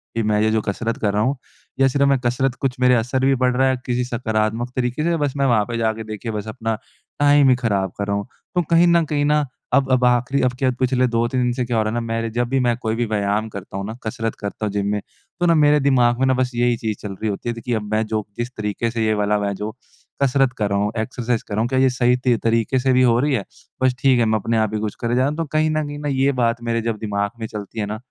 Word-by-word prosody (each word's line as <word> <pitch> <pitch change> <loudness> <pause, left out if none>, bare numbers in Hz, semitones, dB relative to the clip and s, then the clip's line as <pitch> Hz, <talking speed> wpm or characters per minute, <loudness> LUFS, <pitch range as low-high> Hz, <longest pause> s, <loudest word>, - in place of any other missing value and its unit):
कि 115 - 0
मैं 105 0 +1
ये 110 - +3
जो 110 -1 +1
कसरत 115 +4 -3
कर 105 -2 +1
रहा 105 - +1
हूँ, 135 +3 0 0.4
या 135 - +5
सिर्फ़ 140 +1 +2
मैं 135 - +4
कसरत 125 0 -1
कर - - -8
रहा - - +5
हूँ, 130 - -18
कुछ 135 -2 0
मेरे 125 0 +5
असर 125 +3 0
भी 135 0 +4
पड़ 125 0 +2
रहा 135 +1 +3
है 130 - +2
किसी 125 0 0
सकारात्मक 115 -1 -1
तरीके 125 +3 -1
से? 170 0 +1
बस 145 -3 -1
मैं 140 - +2
वहाँ 110 -5 +3
पे 120 -1 -4
जा 115 -1 +1
के 110 0 -7
देखिए, 110 +1 -6
बस 105 0 -5
अपना 115 -1 -2 0.4
टाइम 145 -1 +5
ही 125 - +5
खराब 100 -6 -1
कर 100 0 -3
रहा 100 - 0
हूँ? 100 +4 -3 0.3
तो 175 - +3
कहीं 170 +1 +5
न 170 -1 +4
कहीं 145 -1 0
न 150 0 +2 0.3
अब 135 -1 +3
अब 130 -1 +3
आख़िरी, 125 +3 +2
अब 125 0 +2
क्या 130 - +2
पिछले 130 0 +2
2-3 120 +2 0
दिन 120 - +1
से 125 0 -1
क्या 120 -2 -1
हो 110 - +3
रहा 110 - -1
है - - -4
ना, 120 - 0
मेरे 115 0 -2
जब 120 +2 -1
भी 135 0 +1
मैं 120 -2 +2
कोई 110 -2 -2
भी 120 0 0
व्यायाम 105 0 0
करता 95 -1 -8
हूँ 100 - -4
ना, 110 - -5
कसरत 115 0 -3
करता 105 +1 -4
हूँ 100 - -2
जिम 100 -1 -1
में, 105 - 0 0.4
तो 175 - +2
ना, 170 - +5
मेरे 150 -1 +5
दिमाग 125 -3 +3
में 135 - +3
ना 130 - +4
बस 130 0 0
यही 120 0 +2
चीज़ 110 -2 -3
चल 105 - -5
रही 110 +3 -3
होती 100 +4 -4
है - - -1
देखिए, 115 +1 -3
अब 110 - -2
मैं 110 +1 +1
जो, 110 -1 -2
जिस 120 +1 -2
तरीके 105 +2 -2
से 115 -1 -1
ये 110 - +2
वाला 105 0 +1
मैं 100 0 -1
जो 105 +2 -4 0.5
कसरत 135 -1 +3
कर 105 -2 0
रहा 100 0 +1
हूँ, 105 +1 0
एक्सरसाइज़ 120 0 -2
कर - - -6
रहा 110 - +1
हूँ, 120 - +1
क्या 130 0 +1
ये 130 0 +5
सही 125 0 +2
त 120 -2 +4
तरीके 115 +3 +1
से 130 0 +2
भी 130 - +4
हो 120 -2 +4
रही 145 +2 +1
है? 105 -6 -1 0.4
बस 130 -1 +3
ठीक 130 -3 +4
है, 115 - +3
मैं 110 0 +1
अपने 115 +2 -1
आप 110 -1 0
ही 105 - -1
कुछ 105 -1 -3
करे 120 +1 0
जा - - +2
रहा 135 - +2
हूँ। 150 - -5
तो 165 - -1
कहीं 155 0 +2
न 155 0 0
कहीं, 145 0 -6 0.2
ये 135 +1 +3
बात 115 0 +1
मेरे 115 0 0
जब 115 -1 -2
दिमाग 100 -2 -2
में 110 - -4
चलती 105 0 -7
है 105 - 0
ना, 105 +1 -4
120 Hz, 305 wpm, -21 LUFS, 110-130 Hz, 0.5 s, या